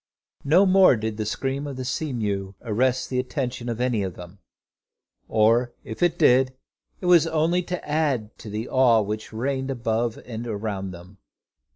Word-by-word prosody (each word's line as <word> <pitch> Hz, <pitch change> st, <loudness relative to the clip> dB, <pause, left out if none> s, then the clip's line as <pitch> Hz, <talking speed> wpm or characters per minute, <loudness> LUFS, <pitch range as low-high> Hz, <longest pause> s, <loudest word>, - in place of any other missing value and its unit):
No 170 Hz, +8 st, +5 dB
more 190 Hz, -6 st, +6 dB
did 110 Hz, -1 st, -4 dB
the 110 Hz, -2 st, -3 dB
scream 135 Hz, +5 st, -2 dB
of 140 Hz, -2 st, -6 dB
the 130 Hz, -, -4 dB
sea 145 Hz, +4 st, -2 dB
mew 100 Hz, -5 st, -3 dB
arrest 125 Hz, +4 st, 0 dB
the 125 Hz, -, 0 dB
attention 125 Hz, -2 st, -3 dB
of 115 Hz, -1 st, -3 dB
any 125 Hz, -4 st, +1 dB
of 95 Hz, -3 st, -4 dB
them, 90 Hz, +2 st, -11 dB, 0.9 s
or 115 Hz, +3 st, +3 dB
if 110 Hz, -, -8 dB
it 175 Hz, -1 st, +2 dB
did, 130 Hz, +1 st, +4 dB, 0.5 s
it -, -, -5 dB
was 170 Hz, -2 st, +5 dB
only 165 Hz, +2 st, +1 dB
to 180 Hz, -2 st, -5 dB
add 145 Hz, -8 st, 0 dB
to 110 Hz, -, -9 dB
the 110 Hz, +3 st, -4 dB
awe 125 Hz, -4 st, +4 dB
which 105 Hz, +1 st, -4 dB
reigned 130 Hz, +4 st, -2 dB
above 115 Hz, -2 st, -1 dB
and 120 Hz, 0 st, -6 dB
around 100 Hz, -3 st, -3 dB
them. 90 Hz, +2 st, -12 dB
120 Hz, 175 wpm, -24 LUFS, 110-140 Hz, 0.9 s, more